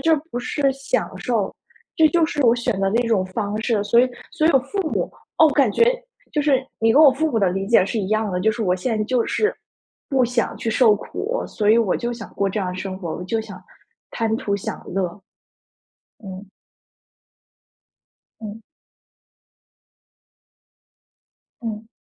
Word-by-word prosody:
这 325 +3 +4 0.2
不 245 - -3
是 265 +4 -3
享 270 -1 -2
受， 215 -2 -1 0.4
这 320 - +6
就 335 0 +3
是 295 -3 -1
我 230 - +6
选 240 -4 -2
择 195 - +1
的 225 - 0
一 240 - -1
种 195 -5 +2
方 205 +2 -3
式， 220 -3 +1
所 205 +3 +3
以 255 - +5 0.2
所 310 - +1
以 - - +5
我 270 - +6
父 335 +10 -7
母 - - -1 0.3
哦， 315 - +7
感 275 -7 +3
觉 465 - +4 0.5
就 300 - +1
是， 270 -3 +2
你 225 0 +3
跟 300 - +6
我 290 - +9
父 310 +4 0
母 230 - +1
的 190 - +3
理 195 +2 -3
解 215 -4 +5
是 220 - -3
一 190 - -2
样 215 -1 0
的， 180 - -1
就 220 +3 +2
是 225 +1 -4
我 180 -2 +1
现 225 +5 -2
在 215 - 0
就 245 0 +1
是 430 - 0 0.5
“不 265 -3 +3
想 240 0 -1
去 225 - -2
受 225 -1 +5
苦， 460 - -4
所 210 -1 0
以 225 - +6
我 215 -5 +1
就 240 0 -3
想 230 -3 -8
过 200 0 0
这 210 +2 -2
样 185 - -2
的 180 - -6
生 190 0 -5
活， 170 -4 -5
我 180 - -6
就 225 +4 -1
想 215 -3 -10 0.5
贪 225 -1 -1
图 200 -2 -2
享 200 - -5
乐“。 190 -2 0 1.2
嗯。 190 0 -8 2.0
嗯。 215 +1 -7 3.0
嗯。 220 -1 -6
225 Hz, 200 characters per minute, -22 LUFS, 200-255 Hz, 3.0 s, 我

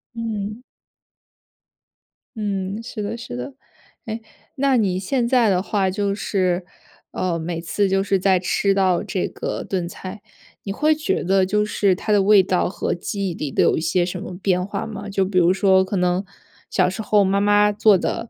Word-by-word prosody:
嗯。 220 -1 -4 1.8
嗯， 200 0 -3
是 230 -2 -6
的 210 +3 -4
是 120 - -7
的。 125 +2 -6 0.5
诶， 225 0 -5 0.3
那 270 -1 +2
你 190 -5 +1
现 235 +5 0
在 240 -3 +3
的 185 -1 +2
话 195 -1 0
就 200 +1 -1
是， 185 -3 -1 0.5
呃， 180 -2 -1
每 165 +1 -4
次 195 +4 0
就 195 0 +2
是 195 -1 +1
再 190 -1 +3
吃 195 +2 +1
到 190 -2 +2
这 195 -2 -2
个 - - -5
炖 180 -3 -2
菜， 190 +3 -8 0.4
你 195 - -4
会 305 +8 +2
觉 310 - -1
得 190 +1 +3
就 210 +2 +1
是 200 -2 +2
它 210 - -4
的 205 - +4
味 205 0 +6
道 180 -1 0
和 - - -2
记 195 +2 -3
忆 175 - -4
里 150 -4 -4
的 - - +1
有 - - +3
一 - - -1
些 175 +1 +1
什 180 +1 -5
么 185 -4 -7
变 180 -2 +1
化 200 +1 -4
吗？ 205 -2 -7
就 195 -1 +1
比 185 -1 -2
如 175 +1 +5
说 190 -1 +4
可 195 +2 -4
能 180 +1 +1 0.5
小 180 -1 +2
时 190 +4 -5
候 210 -1 +3
妈 195 +1 +1
妈 205 0 +4
做 210 -1 +4
的， 225 - -3
195 Hz, 205 characters per minute, -21 LUFS, 185-210 Hz, 1.8 s, 味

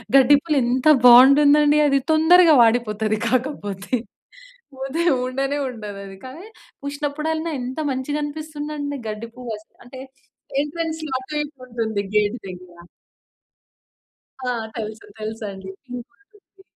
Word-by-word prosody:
గడ్డి 275 +1 +7
పువ్వులు 305 -2 -1
ఎంత 250 +4 0 0.2
బాగుంటుందండి 285 +4 +7
అది 275 -1 +3
తొందరగా 320 +1 +6
వాడిపోతది, 220 -2 +1
కాకపోతే 245 -5 -2 0.8
పోతే 270 +6 -2 0.2
ఉండనే 270 +2 -2
ఉండదు 210 -5 -8
అది. 195 0 -10
కానీ 305 +10 -10 0.4
చూసినప్పుడల్లా 300 +3 -3
ఎంత 250 +3 -6
మంచిగా 265 +3 -3
అనిపిస్తుంది 300 0 -6
అండి. 285 -1 -4
గడ్డి 215 +2 -6
పువ్వు 245 -3 -6
ఆస్ 215 - -18 0.2
అంటే 255 +2 -11 0.6
ఎంట్రన్‌స్‌లో 315 0 -4
ఆటూ 260 +3 -10
ఇటూ 295 0 -11
వుంటుంది 225 -4 -3
గేట్ 210 +3 +2
దగ్గర. 180 -1 -11 1.7
ఆ! - - +1 0.3
తెలుసు 220 0 -6
తెలుసండి. 210 -3 -6 0.2
పింకు 250 -1 -9 0.2
చెట్టు. 395 -1 -24
260 Hz, 120 wpm, -21 LUFS, 220-295 Hz, 1.7 s, గడ్డి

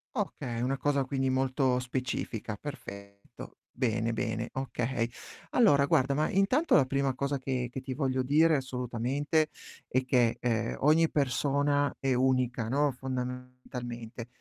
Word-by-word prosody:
Okay, 130 - -3
una 135 +2 0
cosa 140 -1 +1
quindi 135 -1 0
molto 130 -1 +1
specifica. 125 -4 -3
perfetto. 100 -7 -10
Bene, 115 -2 0
bene, 115 0 -2
okay. 125 -2 -2 0.4
Allora 145 - +5
guarda, 140 -4 +3
ma 155 +2 +1
intanto 230 - +3
la 135 - +5
prima 135 0 0
cosa 140 +1 -1
che 130 -1 -2
che 130 - -5
ti 130 0 -5
voglio 130 -2 0
dire 155 +4 +4
assolutamente 130 +4 -1 0.4
è 130 +1 0
che, 125 -3 +3
ehm, 115 -2 0
ogni 155 +3 +4
persona 145 +1 +1
è 135 -1 +1
unica, 125 -2 +1
no, 145 +2 +2
fondamentalmente. 125 -2 -6
130 Hz, 135 wpm, -30 LUFS, 125-140 Hz, 0.4 s, Allora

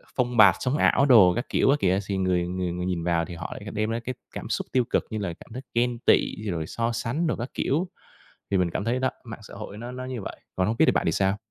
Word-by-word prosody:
phông 125 -1 0
bạt 100 -4 +8
sống 130 +3 0
ảo 140 - +4
đồ 110 -10 +7
các 120 - -2
kiểu - - +2
á 140 - +5
kìa, 95 0 +2
thì 100 -1 -1
người 90 -2 +1
người 90 -1 -2
người 90 +1 -3
nhìn 90 -3 -2
vào 85 -1 +1
thì 85 -1 -8
họ 85 0 -6
lại 100 -1 -8
đem 110 +1 -1
ra 115 +1 -1
cái 130 0 -3 0.2
cảm - - -6
xúc - - -2
tiêu 130 -1 +3
cực, - - +1
như 110 - -4
là 95 -5 -3
cảm 115 - -14
thấy 130 - -5
ghen 120 0 +1
tị, - - +3 0.2
rồi 80 -2 -3
so 115 0 -1
sánh 120 +8 -1
đồ - - 0
các 120 +3 -5
kiểu. 165 +7 0 0.6
Thì 100 - +2
mình 90 -2 +1
cảm 100 - -3
thấy 120 +2 0
đó 130 0 +1
mạng 115 -1 -8
xã 100 - -12
hội 105 0 -8
nó 120 +2 -7
nó 130 0 -6
như 130 -4 -5
vậy, - - -7 0.2
còn 95 - +2
hông 110 +2 -1
biết - - +6
thì - - +5
bạn - - 0
thì - - +2
sao? 95 +1 +1
110 Hz, 290 wpm, -26 LUFS, 95-125 Hz, 0.6 s, bạt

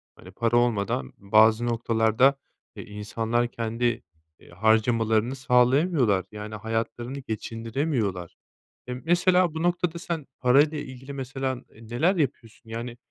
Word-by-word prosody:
Hani, 95 - -14
para 115 +4 +1
olmadan 100 - 0
bazı 110 +3 +4
noktalarda, 115 +3 +2 0.4
eee, - - -7
insanlar 115 +3 -2
kendi, 115 0 -2 0.4
eee, - - -19
harcamalarını 110 +4 +2
sağlayamıyorlar, 125 - +3
yani 105 0 -7
hayatlarını 115 +4 -3
geçindiremiyorlar. 115 - -3 0.5
Emm, 125 0 -5
mesela, 175 0 +3
bu 160 - -3
noktada 175 -1 0
sen 165 -4 -4
parayla 140 +5 +4
ilgili, 130 -1 -8
mesela, 135 0 -3
ııı, 125 - -9 0.3
neler 160 +11 +2
yapıyorsun? 115 -7 -3
Yani, 120 +1 -6
120 Hz, 120 wpm, -26 LUFS, 110-135 Hz, 0.5 s, bazı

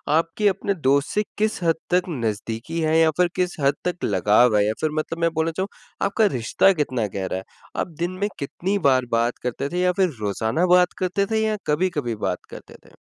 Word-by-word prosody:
आपके 165 +6 +1
अपने 200 0 0
दोस्त 140 +1 +3
से 210 - +2
किस 215 -2 0
हद 165 -1 +3
तक 180 +1 +1
नज़दीकी 115 +2 -3
है? 155 0 +2
या 160 -1 +5
फिर 180 - +4
किस 180 -1 0
हद 140 0 +2
तक 180 0 -3
लगाव 110 +2 +4
है? 105 - +3
या 110 - +1
फिर 155 - +1
मतलब 165 +2 -4
मैं 165 - +3
बोलना 160 +1 0
चाहूँ 190 +4 -2 0.4
आपका 220 +2 +2
रिश्ता 120 +10 +3
कितना 125 -6 -1
गहरा 95 -1 -2
है? 95 - -6 0.3
आप - - -1
दिन 175 +1 -1
में 205 - +1
कितनी 180 +7 -2
बार 130 -1 +3
बात 120 +1 0
करते 125 +3 -2
थे? 180 - -2
या 180 - +3
फिर 185 - +4
रोज़ाना 110 - 0
बात 180 0 +3
करते 185 +2 0
थे 220 - +2
या 215 -1 0
कभी-कभी 150 -6 0
बात - - -4
करते - - -11
थे? - - -20
160 Hz, 210 wpm, -23 LUFS, 120-180 Hz, 0.4 s, या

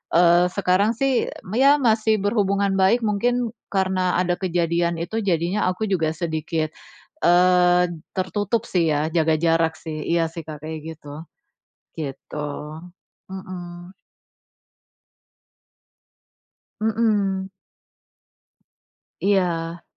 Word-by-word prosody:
eee, 175 +1 +5
sekarang 200 +3 +2
sih 270 -2 +1 0.3
ya 275 +3 +6
masih 220 -2 +3
berhubungan 200 -2 +1
baik, 205 +6 +4
mungkin 240 +3 0 0.2
karena 185 -2 +1
ada 180 -1 +1
kejadian 170 -2 0
itu 220 +6 -3
jadinya 180 +2 0
aku 185 +4 -3
juga 160 -5 +1
sedikit, 160 -1 -2 0.5
eee, 180 0 +5 0.3
tertutup 205 +4 -1
sih, 170 -3 +2
ya, 150 +2 0
jaga 160 -2 +3
jarak 165 -1 +2
sih 155 -2 -6
iya 170 -1 +2
sih 165 -1 -6
Kak, 150 -1 -8
kayak 155 0 -5 0.2
gitu. 150 +1 -10 0.7
Gitu. 150 0 -6 0.9
Mhm. 180 -1 -8 2.9
Mhm. 205 -4 0 1.7
Iya. 175 -4 0
180 Hz, 95 wpm, -22 LUFS, 165-200 Hz, 2.9 s, ya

